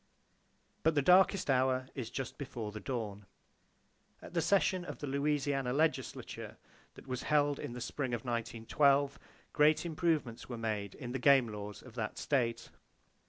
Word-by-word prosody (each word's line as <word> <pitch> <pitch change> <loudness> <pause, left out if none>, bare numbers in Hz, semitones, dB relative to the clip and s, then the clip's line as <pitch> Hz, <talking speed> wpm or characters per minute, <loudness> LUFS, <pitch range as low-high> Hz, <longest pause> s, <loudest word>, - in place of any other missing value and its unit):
But 160 0 +2
the 145 - +3
darkest 185 +3 +5
hour 130 -1 +2
is 120 -4 -5
just 135 +3 -5
before 120 -6 -5
the 110 - -7
dawn. 105 -6 -4 0.9
At - - -12
the 170 - +2
session 185 +1 +2
of - - -7
the - - -5
Louisiana 140 -2 0
legislature 155 +3 -2 0.4
that - - -13
was 130 -2 -4
held 145 -1 +2
in - - -5
the 125 - -6
spring 125 0 -2
of 115 - -7
1912, 125 +4 +1 0.3
great 150 +2 +4
improvements 155 -9 -1
were 120 - -4
made 105 -3 -3
in 120 - -6
the 130 - -2
game 135 -2 +5
laws 105 -1 -7
of 130 - -13
that 110 -3 -4
state. 115 -5 -1
130 Hz, 160 wpm, -33 LUFS, 115-150 Hz, 0.9 s, darkest